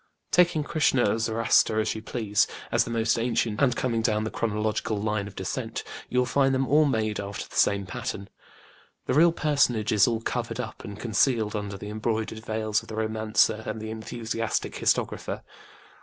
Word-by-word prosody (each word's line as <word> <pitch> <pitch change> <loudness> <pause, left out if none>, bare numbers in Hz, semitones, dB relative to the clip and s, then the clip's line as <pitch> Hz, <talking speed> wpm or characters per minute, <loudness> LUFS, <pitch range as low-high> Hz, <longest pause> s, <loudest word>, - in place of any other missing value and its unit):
Taking 175 -3 +4
KrĖĢsĖĢhnĖĢa 145 -6 +2
or 115 - -2
Zoroaster, 110 -1 +2
as 110 - 0
you 110 - -6
please, 110 -3 0 0.2
as - - +3
the - - -6
most 115 0 +1
ancient, 115 -2 0
and 125 -3 +3
coming 115 -3 0
down 110 -1 +1
the 110 - -3
chronological 110 -1 -1
line 105 -1 -1
of 100 - -11
descent, - - -4 0.3
you 125 - -2
will 125 - +4
find 135 +1 +2
them 130 0 0
all 150 +2 +5
made 110 -6 0
after 100 0 -5
the - - -14
same 100 -1 +3
pattern. 95 +2 -5 0.8
The - - 0
real 165 +5 +6
personage 140 -9 +1
is 105 -2 +5
all 115 -2 0
covered 115 0 -3
up 110 -3 -6
and 105 -1 -8
concealed 110 -1 +1
under 100 -1 -4
the 105 - -7
embroidered 110 0 -2
veils 110 -1 -1
of 115 - -16
the 110 - -7
romancer 110 0 +1
and 110 +1 -3
the 110 0 -5
enthusiastic 115 0 -3
historiographer. - - -1
110 Hz, 185 wpm, -26 LUFS, 110-120 Hz, 0.8 s, real